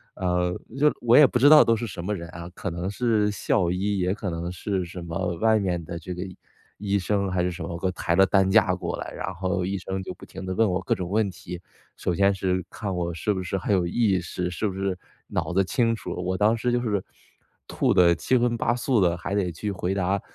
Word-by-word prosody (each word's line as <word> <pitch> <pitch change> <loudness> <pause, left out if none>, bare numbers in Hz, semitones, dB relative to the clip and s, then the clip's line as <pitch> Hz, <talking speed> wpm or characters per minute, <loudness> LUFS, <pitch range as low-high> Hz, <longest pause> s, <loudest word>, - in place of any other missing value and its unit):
呃， 90 -1 0 0.2
就 150 +2 +4
我 120 0 +4
也 150 - +9
不 125 - +1
知 145 +3 +7
道 155 -1 +9
都 115 - +3
是 120 +1 -4
什 85 -2 -7
么 105 +3 -1
人 85 -2 -7
啊， 85 +1 -8
可 95 - -4
能 85 +3 -3
是 105 -2 +1
校 90 -2 +1
医， 100 +2 -1
也 90 +1 +1
可 100 -3 -4
能 85 +1 -4
是 95 +1 -2
什 85 +1 -8
么 85 +1 -3
外 110 +1 +3
面 90 -5 -1
的 85 - -6
这 90 +2 -6
个 90 - -6 0.6
医 100 -1 0
生， 100 0 0
还 90 - +1
是 90 - +1
什 85 -1 -6
么 85 0 -5
给 95 - -1
我 - - 0
抬 85 - -1
着 95 - +7
担 95 0 +3
架 100 -4 +4
过 95 - -4
来。 - - -5
然 95 - -4
后 95 +1 -1
医 100 +1 -2
生 95 +1 -4
就 90 - -6
不 - - -13
停 95 +1 -9
地 95 - -3
问 110 +1 +2
我 90 0 -1
各 - - 0
种 90 -1 -5
问 105 -1 +1
题， 90 0 -9 0.3
首 90 - -2
先 100 +2 +3
是 95 -1 -1
看 100 -3 -4
我 85 -1 -2
是 95 +6 -1
不 95 - -3
是 95 +1 -2
很 100 +2 -1
有 90 -2 +2
意 100 -1 +2
识， 90 +1 -4
是 105 +5 -1
不 95 - -4
是 95 -1 -2 0.3
脑 - - -2
子 95 +2 +3
清 115 +2 +1
楚。 - - -7
我 95 +1 -1
当 110 +2 +3
时 120 +2 0
就 120 - +1
是， 105 -5 -1 0.6
吐 - - +1
的 85 -1 +6
七 130 - 0
荤 120 -1 +1
八 120 +1 +1
素 125 -1 +1
的， 90 -2 +3
还 90 +2 -5
得 100 -3 +1
去 100 +5 -4
回 90 0 -2
答 95 +1 0
95 Hz, 275 characters per minute, -25 LUFS, 90-105 Hz, 0.6 s, 也